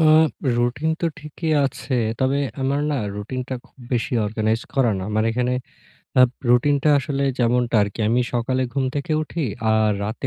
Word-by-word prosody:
আ - - +5 0.5
routine 125 +6 0
তো 170 - +1
ঠিকই 155 +2 -4
আছে। 135 0 -3 0.3
তবে 130 +1 +2 0.2
আমার 140 +2 +1
না - - 0 0.2
রুটিনটা 130 +5 -4
খুব - - -32
বেশি 125 +4 -1
অর্গানাইজ 110 +1 0
করা 130 -4 +3
না। 95 - -4
আমার 110 +1 +1
এখানে 125 +2 0 0.7
আ - - +8 0.3
রুটিনটা 140 +4 +3
আসলে 140 0 -2 0.2
যেমনটা 120 -1 +2
আর 100 - 0
কি। - - -6
আমি 120 +2 +3
সকালে 130 +2 0
ঘুম 135 0 0
থেকে 145 +2 -2
উঠি 160 +1 -4 0.3
আর 110 -1 +3
রাতে 110 +3 -4
125 Hz, 170 wpm, -22 LUFS, 115-140 Hz, 0.7 s, আ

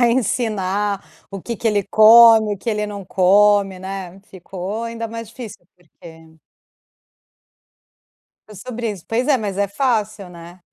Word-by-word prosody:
tentar 240 -1 +4
ensinar 205 -4 -2 0.3
o 195 -1 -7
que 235 +5 -6
que 225 - -1
ele 205 -2 0
come, 220 0 +6
o - - -14
que 235 - -8
ele 210 -1 -1
não 205 -1 -7
come, 195 +1 +2
né. 190 -1 -8
Ficou 190 +3 -7
ainda 230 0 -5
mais 230 0 -8
difícil, 225 -6 -11
porque 160 -1 -17 2.2
Para 215 - -14
os 190 - -12
sobrinhos. 225 -6 -6
Pois 245 +4 -2
é, 285 - +4
mas 205 -5 -5
é 200 0 0
fácil, 215 -4 -2
né. 175 +1 -14
205 Hz, 150 wpm, -19 LUFS, 190-230 Hz, 2.2 s, come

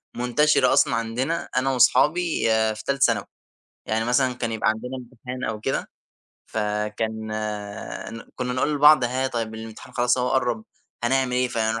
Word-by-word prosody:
منتشرة 125 +2 +3
أصلًا - - +4
عندنا 120 +8 -2
أنا 135 +1 +2
وأصحابي 150 +7 +3 0.3
في 110 - -9
تالتة 140 0 -1
ثانوي، - - +1 0.6
يعني 110 +1 0
مثلًا 125 +1 +2
كان 120 -2 -3
يبقى 110 -1 +1
عندنا 125 +4 -3
امتحان 125 +1 -8
أو 110 -1 -2
كده، 135 +5 -2 0.6
فكان 110 +1 -2 0.9
ن 115 - -8
كنّا 125 -1 -3
نقول 145 +4 0
لبعض: 150 -1 +6
ها 130 +2 0
طيّب، 115 -3 -3
الامتحان 110 +3 -9
خلاص 125 0 +2
أهو 125 0 +1
قرب، 120 -4 0 0.4
هنعمل 130 +1 +1
إيه؟ 125 0 +1
فهنر 115 -1 -1
125 Hz, 155 wpm, -24 LUFS, 110-130 Hz, 0.9 s, لبعض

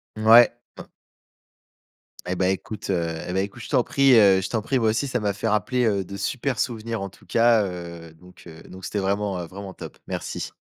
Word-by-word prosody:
Mouais 115 +2 +7 0.3
m - - -11 1.4
Et 90 - -1
bah, 95 0 +1
écoute, 100 +1 -4
heu 85 -2 -1
et 90 - -4
bah 95 - +1
écoute, 100 +4 -6
je - - -9
t'en 130 -4 +3
prie, 135 -2 +3
heu, 100 -4 +6
je 95 - -3
t'en 115 - -1
prie. 130 +5 -1
Moi 110 -2 +2
aussi 115 +6 0
ça 125 -2 -1
m'a 100 -2 -1
fait 100 - -3
rappeler, 110 +4 +1
heu, 100 -4 0
de 100 +1 -8
super 125 +5 -2
souvenirs 115 -3 -3
en 100 - -4
tout - - -21
cas, 115 -2 +3
heu, 85 -3 -8
donc, 90 +2 -18
heu, 80 -1 -12
donc 95 +1 -10
c'était 105 - -3
vraiment, 100 0 -1
heu, 85 - -6
vraiment 95 +1 -9
top. - - -10
Merci. - - -5
100 Hz, 220 wpm, -24 LUFS, 95-115 Hz, 1.4 s, Mouais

